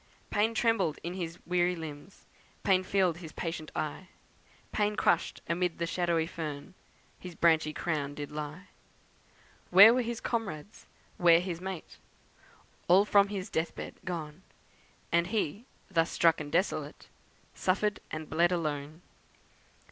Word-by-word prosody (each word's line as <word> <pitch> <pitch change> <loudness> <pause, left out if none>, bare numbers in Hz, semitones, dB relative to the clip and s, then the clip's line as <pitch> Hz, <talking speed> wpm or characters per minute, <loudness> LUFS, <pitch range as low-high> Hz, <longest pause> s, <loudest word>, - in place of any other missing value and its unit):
Pain 220 +2 +1
trembled 220 -9 +1
in 170 +2 -4
his 175 -2 -5
weary 180 0 +1
limbs, 160 +2 -9 0.4
Pain 190 -2 +4
filled 185 -3 +1
his 165 -3 -9
patient 165 -2 -5
eye, 155 +4 -4 0.6
Pain 210 0 0
crushed - - +1
amid 175 0 0
the 170 - -1
shadowy 170 -2 0
fern 155 -2 -6 0.5
His 180 -2 -9
branchy 160 -2 +3
crown 150 -3 -2
did 145 0 -6
lie. 150 +5 -6 1.0
Where 200 +5 +9
were 250 - +2
his 235 -1 -3
comrades? 205 -6 -4 0.3
where 170 -4 +6
his 175 -1 -4
mate? 190 -3 -7 0.9
All 190 +4 +6
from 200 -1 +5
his 195 -2 -5
death 160 +1 -1
bed - - -6
gone! 165 -2 -5 0.7
And 170 +1 +3
he, 210 +1 -2 0.3
thus 165 -2 +2
struck 165 -2 +3
and 145 -1 -7
desolate, 180 +5 -1 0.5
Suffered 205 +2 0
and 155 0 -5
bled 170 +2 +2
alone. 155 -1 -3
175 Hz, 135 wpm, -30 LUFS, 160-190 Hz, 1.0 s, Where